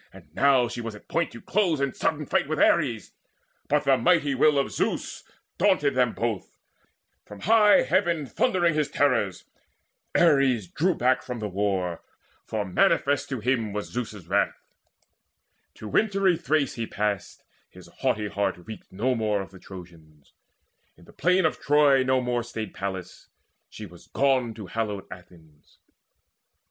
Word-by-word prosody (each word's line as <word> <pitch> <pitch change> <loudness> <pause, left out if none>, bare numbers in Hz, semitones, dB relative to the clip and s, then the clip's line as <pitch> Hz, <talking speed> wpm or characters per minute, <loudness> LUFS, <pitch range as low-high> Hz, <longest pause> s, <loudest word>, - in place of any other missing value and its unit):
And - - -17
now 135 -3 +3
She 120 0 -6
was 115 -2 -6
at 105 - -15
point 170 0 0
to 115 - -9
close 180 - 0
in 140 -1 -1
sudden 150 -1 -1
fight 140 - 0
With 155 +1 -2
Ares; 125 -10 +2 0.6
but 150 +1 +1
the 135 -1 +3
mighty 145 +1 +2
will 145 +2 +3
of 140 - 0
Zeus - - -3 0.4
Daunted 140 -1 +3
them 125 -2 +1
both, 115 -5 -4 0.7
from 105 -1 -12
high 210 0 +5
heaven 170 -5 +1
thundering 175 - +1
His 150 -2 0
terrors. 115 -10 0 0.7
Ares 135 - +3
drew 170 - 0
back 130 +1 +2
from 125 -1 -6
the 110 -2 -4
war, 95 -3 -2 0.4
For 110 -2 -3
manifest 140 +9 +1
to 130 -5 -4
him 115 -3 0
was 105 0 -5
Zeus's 110 -6 -5
wrath. 100 +3 0 1.1
To 110 - -9
wintry 195 - +2
Thrace 150 -3 0
he 115 -1 -4
passed; 100 -2 -3 0.3
his - - -15
haughty 105 0 0
heart 100 0 -1
Reeked 110 +5 -11
no 120 +7 0
more 110 -3 0
of 95 - -14
the 95 - -14
Trojans. 85 -6 -14 0.6
In 85 - -19
the - - -18
plain 180 0 +2
Of 160 - 0
Troy 145 -2 +4
no 130 0 +1
more 125 -1 -1
stayed 115 -3 -6
Pallas; 95 -2 -6 0.4
she 110 - -9
was 85 -3 -15
gone 130 -4 +1
To 105 -2 -8
hallowed 105 0 -4
Athens. 80 -4 -16
120 Hz, 155 wpm, -25 LUFS, 100-145 Hz, 1.1 s, high